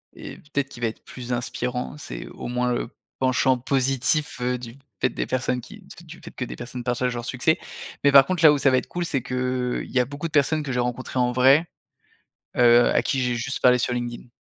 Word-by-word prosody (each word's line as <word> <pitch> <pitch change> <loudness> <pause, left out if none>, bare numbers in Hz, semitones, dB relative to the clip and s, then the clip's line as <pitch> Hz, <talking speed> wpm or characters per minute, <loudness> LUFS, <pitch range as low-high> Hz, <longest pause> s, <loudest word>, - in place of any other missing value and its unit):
et - - -9
peut-être 140 -2 -3
qu'il 120 -3 -12
va 115 - +2
être 110 - -12
plus 125 -1 -6
inspirant. 125 +3 -3
C'est - - -7
au - - -8
moins 125 0 0
le 120 - -3 0.3
penchant 130 0 +2
positif, 135 +3 0
heu, 125 0 0
du 120 -1 -9 0.3
fait 125 - +3
des - - -3
personnes 130 -1 -1
qui - - -13 0.2
du - - -17
du - - -12
fait - - -9
que - - -5
des 60 - -7
personnes 120 - -7
partagent 125 0 -1
leur 120 0 -5
succès, 130 +7 +1 0.5
mais 140 - +5
par 135 -1 +8
contre, 180 -1 -2
là 155 - +9
où - - +1
ça 140 - +3
va 130 - +4
être - - -2
cool, 175 -1 -3
c'est 140 -5 -1
que, 125 - -7 0.5
heu, - - -6
il - - -13
y 130 - +2
a 125 - +3
beaucoup 145 +5 -5
de 160 - -14
personnes 150 +1 +2
que 140 - -4
j'ai 125 - -1
rencontrées 125 +1 -2
en 125 0 +2
vrai, 135 +6 +5 0.9
heu, 120 0 +6
à - - +3
qui 135 - -1
j'ai 125 -1 0
juste 135 +3 -3
parlé 125 0 +6
sur 125 0 -1
LinkedIn. 120 0 -5
125 Hz, 245 wpm, -24 LUFS, 125-135 Hz, 0.9 s, là